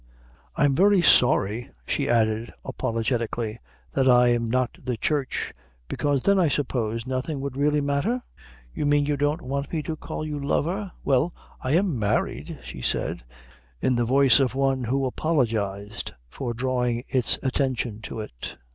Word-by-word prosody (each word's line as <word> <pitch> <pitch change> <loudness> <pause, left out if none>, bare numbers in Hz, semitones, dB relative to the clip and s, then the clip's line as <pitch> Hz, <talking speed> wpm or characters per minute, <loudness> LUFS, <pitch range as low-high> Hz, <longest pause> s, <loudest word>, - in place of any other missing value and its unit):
I'm 145 -2 +3
very 195 +3 +4
sorry," 120 - +4 0.2
she 140 -1 -1
added 110 0 +1
apologetically, 115 -1 -2 0.3
"that 130 -1 +3
I'm 120 -1 +5
not 125 +2 -1
the 125 -2 -2
Church 140 +3 -1 0.3
because 140 - 0
then 200 -1 +4
I 175 - +4
suppose 115 -6 -1
nothing 130 +3 -2
would 135 -1 -4
really 150 +1 +2
matter?" 145 - 0 0.5
"You 145 - -1
mean 145 0 +3
you 145 0 +1
don't 145 +4 0
want 140 +2 -3
me 160 -3 -1
to 160 - -3
call 155 - -5
you 150 -2 -4
lover?" 180 +7 -1
"Well, 140 +5 +2 0.3
I 130 - 0
am 170 - +2
married," 105 -1 -1
she 65 - -8
said, - - -1 0.6
in 130 - +2
the 120 - +2
voice 135 +1 +5
of 130 -2 +1
one 135 -2 +1
who 135 +3 0
apologised 110 -9 -1
for 120 - -5
drawing 125 -1 0
his 130 -3 +2
attention 130 -5 -1
to 110 +1 -5
it. - - -8
130 Hz, 155 wpm, -25 LUFS, 120-145 Hz, 0.6 s, I'm